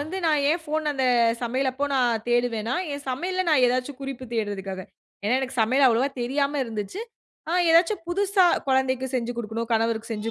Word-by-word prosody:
வந்து 315 +6 -5
நான் 300 -3 +2
ஏன் 335 +2 0
போன், 310 +1 -2
அந்த 265 -2 -1 0.4
சமையல் 260 +3 0
அப்போ 280 +3 -2
நான் 240 -4 +1
தேடுவேனா, 240 0 0 0.2
என் 285 0 -6
சமையலில 370 +8 -2
நான் 295 -5 +4
ஏதாச்சு 255 +3 -1
குறிப்பு 270 -2 -6
தேடுறதற்காக, 195 -3 -3 0.4
ஏனா 220 +5 +2
எனக்கு 260 -2 -2
சமையல் 260 +5 +4
அவ்வளவா 245 +3 +2
தெரியாம 280 +3 0
இருந்துச்சு, 225 - -5 0.5
ஆ - - 0 0.2
ஏதாச்சும் 335 +5 +4
புதுசா 390 0 +3 0.2
கொழந்தைக்கு 260 0 +1
செஞ்சு 245 0 -3
குடுக்கணும், 230 +1 -4
கணவருக்கு 225 0 -1
செஞ்சு 215 +1 -4
260 Hz, 170 wpm, -25 LUFS, 230-290 Hz, 0.5 s, நான்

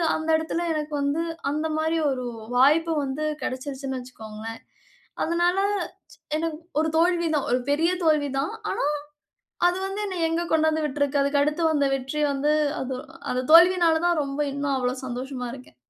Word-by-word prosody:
அந்த 315 0 -3
இடத்துல 320 +2 -2
எனக்கு 300 -1 -3
வந்து, 285 +4 0 0.3
அந்த 305 +2 -1
மாரி 320 +1 +1
ஒரு 255 -2 -3 0.3
வாய்ப்பு 315 +5 +4
வந்து 275 +3 -3 0.2
கெடச்சிருச்சுன்னு 265 0 -4
வச்சுக்கோங்களேன். 225 -2 -9 0.6
அதனால 345 +2 +1 0.8
எனக்கு 320 -1 -2 0.2
ஒரு 320 - +1
தோல்விதான் 335 -3 +2
ஒரு 250 - +3
பெரிய 320 +4 +3
தோல்விதான். 290 0 +1 0.2
ஆனா, - - -1 0.8
அது 355 +1 +1
வந்து 390 +1 -4
என்னைய 360 -4 -1
எங்க 330 +1 0
கொண்டு 315 0 +3
வந்து 315 0 0
விட்டுருக்கு? 285 0 0
அதுக்கு 280 +1 +2
அடுத்து 300 +3 -1
வந்த 290 -2 +2
வெற்றி 270 +3 -3
வந்து, 290 +2 +1 0.3
அது 260 0 -3 0.4
அந்த 255 +1 -1
தோல்வியினால 340 -1 +6
தான் 345 -3 +2
ரொம்ப 275 +1 -3
இன்னும் 280 0 -1
அவ்வளவு 255 +1 -2
சந்தோஷமா 250 +1 -5
இருக்கேன். 260 -1 -12
295 Hz, 150 wpm, -25 LUFS, 270-325 Hz, 0.8 s, தோல்வியினால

